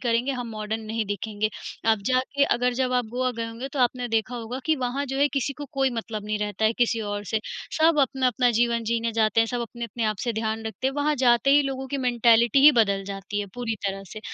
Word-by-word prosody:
करेंगे, 240 +2 +1
हम 245 -2 -5
मॉडर्न 215 0 -4
नहीं 220 0 -3
दिखेंगे। 210 +1 -2 0.4
आप 220 - +3
जाके 260 +2 +2
अगर 245 -1 +1
जब 255 0 0
आप 250 -1 +2
गोवा 255 0 +1
गए 230 - -2
होंगे 230 +4 -6
तो 285 - -4
आपने 245 0 +1
देखा 225 +2 0
होगा 235 +2 -5
कि 315 -1 +3
वहाँ 260 +2 -2
जो 270 +1 -3
है 285 - +4
किसी 280 0 -1
को 290 +2 -8
कोई 270 -1 +1
मतलब 225 -3 -5
नहीं 210 0 -2
रहता 210 0 -2
है 220 - +4
किसी 235 -1 +2
और 205 -1 -4
से। 220 +3 -1 0.4
सब 315 -1 +4
अपना-अपना 255 -2 +2
जीवन 235 0 +1
जीने 230 0 -1
जाते 220 0 +2
हैं, 225 - +3
सब 245 +1 -3
अपने-अपने 235 -1 -4
आप 215 -1 0
से 235 - 0
ध्यान 220 0 -2
रखते 220 +4 -3
हैं। 270 - -1
वहाँ 295 +1 +1
जाते 245 +1 +4
ही 290 +1 +6
लोगों 265 -1 -4
की 280 - -2
मेन्टैलिटी 235 0 +4
ही 300 - +11
बदल 200 -5 +2
जाती 200 +1 -4
है 205 - -4
पूरी 240 -2 -2
तरह 195 0 -3
से। 215 - -8
235 Hz, 240 wpm, -25 LUFS, 220-260 Hz, 0.4 s, ही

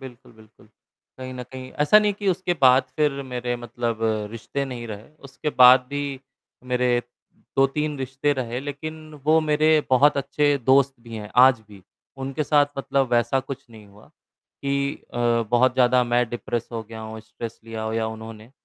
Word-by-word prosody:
बिल्कुल, 125 -3 -12
बिल्कुल। 110 -1 -21 0.5
कहीं 130 0 -7
न 125 - -6
कहीं 130 +1 -10
ऐसा 150 +8 +6
नहीं 210 -1 +2
है - - -14
कि 205 - -1
उसके 180 -1 0
बाद 130 0 +6
फिर 150 -2 +2
मेरे 125 -2 -3
मतलब 120 -1 -4 0.3
रिश्ते 125 +5 -4
नहीं 125 -3 -6
रहे। 105 0 -9 0.2
उसके 140 +3 -4
बाद 125 +1 +9
भी 145 0 -2 0.7
मेरे 125 0 +2 0.7
2-3 145 +2 +1
रिश्ते 135 +2 -1
रहे 125 -2 -3
लेकिन 145 +3 -6 0.3
वो 160 +2 +4
मेरे 155 0 +2 0.2
बहुत 140 +3 +5
अच्छे 145 +1 +1
दोस्त 135 0 +4
भी 115 -1 -11
हैं, 105 -1 -7
आज 130 -1 +6
भी। 100 -2 -15 0.3
उनके 135 +3 -3
साथ 145 -1 +4
मतलब 135 -1 0
वैसा 120 +2 +2
कुछ 135 0 -8
नहीं 110 -2 -14
हुआ, 100 +1 -19 0.6
कि 140 0 -1 0.2
अ, - - -3 0.3
बहुत 125 +1 +3
ज़्यादा 125 -1 +4
मैं 120 0 +1
डिप्रेस 120 -1 -4
हो 115 -1 -4
गया 110 +1 -10
हूँ, 110 0 -8
स्ट्रेस 115 +1 -9
लिया 115 -1 -6
हो 110 0 -3
या 110 0 -1
उन्होंने, 110 0 -9
130 Hz, 175 wpm, -23 LUFS, 115-140 Hz, 0.7 s, बाद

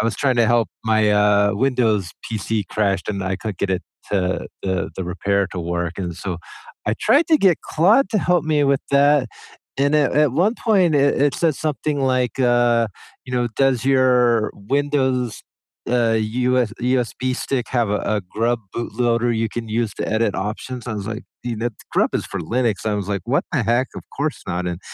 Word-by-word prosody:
I - - 0
was 115 - -1
trying 135 -3 +1
to 115 -2 +4
help 115 -4 +2 0.2
my, 110 -1 +3
uh, 105 0 +4
Windows 110 -7 +1 0.2
PC 110 -1 -2
crashed, 100 -4 0
and 100 -2 -2
I 95 0 -1
couldn't 105 -2 -6
get 100 - -1
it 95 - -1 0.3
to 95 -2 0 0.2
the 95 -1 -1
the 95 - -3
repair 100 +3 0
to 95 - -5
work, 85 +1 -2
and 90 -3 -3
so 90 -1 -4 0.5
I 105 - +2
tried 310 +4 +4
to 315 -2 +5
get 185 -5 +4
Claude 210 - +3
to 215 - +2
help 180 -1 +2
me 150 -2 +2
with 140 -1 +2
that, 140 -2 +4 0.5
and 140 +2 +2
at 150 -3 +3
at 150 -3 +3
one 190 - +2
point 190 -8 +3
it 140 -1 +3
it 145 -1 +2
said 165 -4 +1
something 150 -1 -2
like, 130 -2 0
uh, 120 -2 +3 0.4
you 125 - -9
know, 120 -1 +1
"Does 135 -3 +2
your 125 -4 +3
Windows, 130 +1 -1 0.5
uh, 120 -2 +2
US 125 +1 0
USB 125 0 0
stick 125 -2 -2
have 120 -4 +1
a 105 - +1 0.2
a 105 - -1
GRUB 115 +6 -1 0.2
bootloader 120 0 0
you 110 0 0
can 115 0 -6
use 115 -1 -1
to - - -4
edit 110 -3 +1
options?" 115 +5 -5
I 120 - -3
was 100 -1 -5
like, 110 +2 -5 0.2
"You 120 -2 -3
know, 120 +2 -1 0.3
GRUB - - +2
is - - -4
for 100 - -5
Linux," 115 +2 -1
I 105 - +1
was 100 -2 -3
like, 100 -2 -2
"What - - +1
the - - +1
heck? 120 +3 +2
Of - - -6
course 150 +2 -2
not," 90 +1 -2
and 90 0 -4
120 Hz, 200 wpm, -21 LUFS, 105-135 Hz, 0.5 s, to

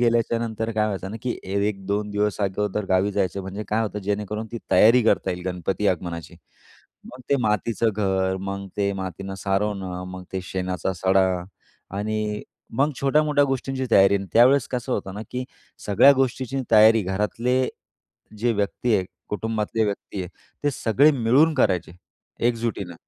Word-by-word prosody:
गेल्याच्यानंतर 115 -1 0
काय 110 -1 +1
व्हायचं 95 -2 -4
ना 110 - -5
की 125 -2 -2
1-2 100 +1 -2
दिवस 105 0 -1
अगोदर 105 +1 -1
गावी 95 +2 +2
जायचो 100 0 -1
म्हणजे 95 +3 -6
काय 110 +2 +1
होतं 105 -1 -3
जेणेकरून 105 +2 -3
ती 115 - -3
तयारी 115 +3 +6
करता 110 -3 +2
येईल 90 -1 -5
गणपती 90 +3 -2
आगमनाची. 85 -1 -3 0.7
मग 125 +1 -11
ते 140 - +5
मातीचं 110 +1 +1
घर. 95 -2 +1
मग 100 0 -5
ते 100 -1 +1
मातीनं 95 0 -5
सारवणं, 95 -2 -2
मग 95 0 -8
ते 95 - -2
शेणाचा 90 0 -3
सडा 95 +2 +3 0.7
आणि 105 0 -2 0.4
मग 145 +2 +3
छोट्या-मोठ्या 145 +1 +3
गोष्टींची 135 -1 -2
तयारी 95 -2 +6
आणि 100 0 -5
त्यावेळेस 125 +3 +5
कसं 125 0 -3
होतं 95 -4 -3
ना 105 - -5
की 125 0 -3 0.4
सगळ्या 105 +8 +7
गोष्टीची 130 0 -1
तयारी 110 0 +6
घरातले 115 +7 0 0.7
जे 120 +2 +1
व्यक्ती 105 +3 0
आहे, 95 - -1 0.2
कुटुंबातले 110 +1 -1
व्यक्ती 100 -1 -4
आहे, 90 - -7 0.4
ते 145 - +3
सगळे 130 +5 +4
मिळून 135 +6 +3
करायचे 90 - +1 0.6
एकजुटीनं. 115 -6 -3
105 Hz, 150 wpm, -24 LUFS, 95-115 Hz, 0.7 s, सगळ्या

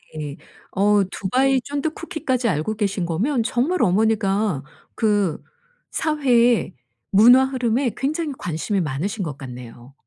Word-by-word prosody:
네. 150 0 -6 0.3
어 205 +1 +3
두바이 260 +7 +1
쫀득 290 +4 -3
쿠키까지 265 -8 -2
알고 165 +6 -1
계신 200 -4 -1
거면 225 - 0
정말 260 +10 0
어머니가 200 -4 +1 0.3
그 205 -7 +1 0.5
사회의 245 - +2 0.4
문화 245 +6 +7
흐름에 255 -1 0
굉장히 300 +3 -2
관심이 170 +4 -2
많으신 175 +8 -3
것 145 -4 -5
같네요. 125 -1 -10
215 Hz, 270 characters per minute, -22 LUFS, 175-260 Hz, 0.5 s, 문화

